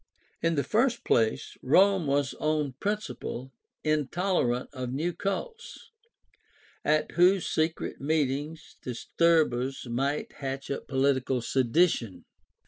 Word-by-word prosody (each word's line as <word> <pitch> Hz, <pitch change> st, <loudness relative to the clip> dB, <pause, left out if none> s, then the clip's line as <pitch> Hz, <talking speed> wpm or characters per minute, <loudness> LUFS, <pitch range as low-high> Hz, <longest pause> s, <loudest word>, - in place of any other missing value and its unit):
In 165 Hz, 0 st, +1 dB
the 140 Hz, -, +1 dB
first 235 Hz, -, +1 dB
place 115 Hz, +5 st, +1 dB
Rome 185 Hz, +4 st, +4 dB
was 140 Hz, -2 st, +1 dB
on 150 Hz, -2 st, 0 dB
principle 200 Hz, -, -4 dB, 0.3 s
intolerant 155 Hz, -3 st, 0 dB
of 130 Hz, -2 st, -4 dB
new 160 Hz, +7 st, -1 dB
cults, 455 Hz, -, -5 dB, 0.9 s
at 155 Hz, 0 st, +1 dB
whose 180 Hz, +2 st, +4 dB
secret 160 Hz, -2 st, -1 dB
meetings 150 Hz, +2 st, -2 dB
disturbers 135 Hz, 0 st, +1 dB
might 135 Hz, +5 st, -1 dB
hatch 135 Hz, 0 st, -4 dB
up 140 Hz, -, -4 dB
political 130 Hz, -1 st, +1 dB
sedition. 125 Hz, -, +1 dB
145 Hz, 105 wpm, -28 LUFS, 130-170 Hz, 0.9 s, Rome